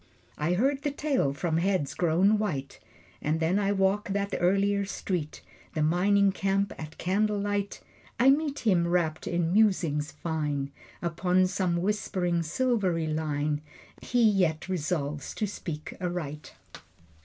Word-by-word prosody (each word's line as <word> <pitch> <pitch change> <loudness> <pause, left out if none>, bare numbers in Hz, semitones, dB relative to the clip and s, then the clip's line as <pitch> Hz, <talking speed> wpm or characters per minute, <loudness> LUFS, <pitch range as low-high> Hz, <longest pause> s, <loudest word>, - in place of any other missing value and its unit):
I 160 +4 0
hear 265 +9 +3
the 285 +1 -3
tale 280 - 0
from 160 +3 -1
heads 180 -5 0
grown 185 +5 +3
white. 140 -11 -3 0.4
And 155 +2 0
then 170 +5 +2
I 200 -1 +1
walk 195 +1 +1
that 200 0 -1
earlier 200 +3 +2
street, 180 -5 -4 0.3
The 155 - +1
mining 195 +5 +3
camp 195 +1 0
at 155 0 -8
candle 210 +3 +1
light. 205 0 -2 0.4
I 260 +3 +7
meet 290 0 0
him 175 -5 +3
wrapped 170 -3 0
in 170 0 0
musings 180 -9 +2
fine 150 -4 -2 0.3
Upon 180 +2 +2
some 185 -2 0
whispering 185 -4 0
silvery 185 -2 0
line 150 -1 -1 0.4
He 245 -1 +1
yet 185 -7 +2
resolves 150 -5 -2
to 215 - 0
speak 165 -6 -6
aright. 155 -5 -4
180 Hz, 135 wpm, -28 LUFS, 160-200 Hz, 0.4 s, I